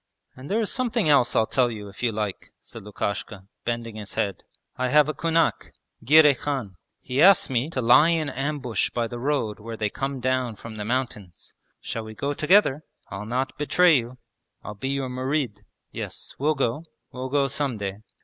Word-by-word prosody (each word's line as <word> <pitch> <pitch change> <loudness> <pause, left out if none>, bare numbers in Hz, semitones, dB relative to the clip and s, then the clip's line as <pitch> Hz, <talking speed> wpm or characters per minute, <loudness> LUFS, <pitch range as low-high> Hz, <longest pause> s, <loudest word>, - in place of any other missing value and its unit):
And 130 +2 -10
there 215 - +1
is 220 - 0
something 235 -6 0
else 140 -5 +4
I'll 110 - +4
tell 125 +2 +2
you 105 -3 -7
if 100 0 -12
you 120 -2 +1
like,' 105 -3 -4
said - - -11
Lukashka, 100 -1 -4 0.2
bending 115 -2 -3
his 105 -2 -8
head. 100 -3 -2 0.3
'I 130 - -1
have 150 +2 +5
a 155 - -1
kunak, 165 0 0 0.3
Girey 150 +3 +7
Khan. 130 -7 -4 0.3
He 125 +2 -1
asked 195 -5 +6
me 125 +4 0
to 130 -6 -3
lie 130 +7 +6
in 165 -3 +1
ambush 135 -4 -2
by 120 -1 -1
the 120 +1 -7
road 120 -6 -1
where 115 +1 -7
they 105 -1 -1
come 135 0 -3
down 130 -2 0
from 110 +1 -10
the 105 - -4
mountains. 110 -7 -4 0.3
Shall 115 - -4
we 110 0 -9
go 140 +6 -2
together? 155 -2 +3 0.3
I'll 100 +1 -6
not 130 +4 -2
betray 170 +3 +4
you. 125 +1 -5 0.5
I'll 105 - -6
be 105 +6 -5
your 135 -1 -1
murid.' 130 -2 -2 0.3
'Yes, - - -6
we'll 150 +3 +2
go; 135 +3 -1 0.3
we'll 130 +1 -5
go 140 0 +2
some 135 -3 -2
day.' 100 -1 -4
130 Hz, 190 wpm, -25 LUFS, 110-145 Hz, 0.5 s, Girey